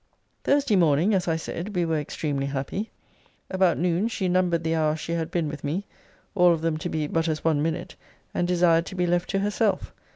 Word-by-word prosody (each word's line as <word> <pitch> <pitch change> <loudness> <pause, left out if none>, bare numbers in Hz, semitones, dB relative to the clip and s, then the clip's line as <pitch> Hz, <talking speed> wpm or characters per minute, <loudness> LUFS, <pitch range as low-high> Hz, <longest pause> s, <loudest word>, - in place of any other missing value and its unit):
Thursday 280 -6 +3
morning, 170 +3 +3
as 185 -2 +1
I 165 - +2
said, 170 +5 -5
we 175 -1 +2
were 160 -2 0
extremely 145 -1 -2
happy 140 +10 -3 0.6
about 185 -2 +3
noon, 180 +4 +1
she 205 -5 -2
numbered 180 -2 +1
the 160 0 0
hours 155 -1 +1
she 165 - -5
had 165 -1 -1
been 170 -3 -1
with 150 -1 -6
me; 165 +8 -2 0.5
all 180 -3 +5
of 165 - -2
them 165 -1 0
to 165 +3 -4
be 155 -2 -1
but 165 +2 0
as 155 -1 -2
one 155 -3 +2
minute; 160 +1 -2 0.4
and 175 - 0
desired 170 -1 +3
to 190 - -7
be 180 -1 +1
left 175 +1 0
to 195 - 0
herself. 205 0 0
170 Hz, 215 wpm, -25 LUFS, 160-185 Hz, 0.6 s, all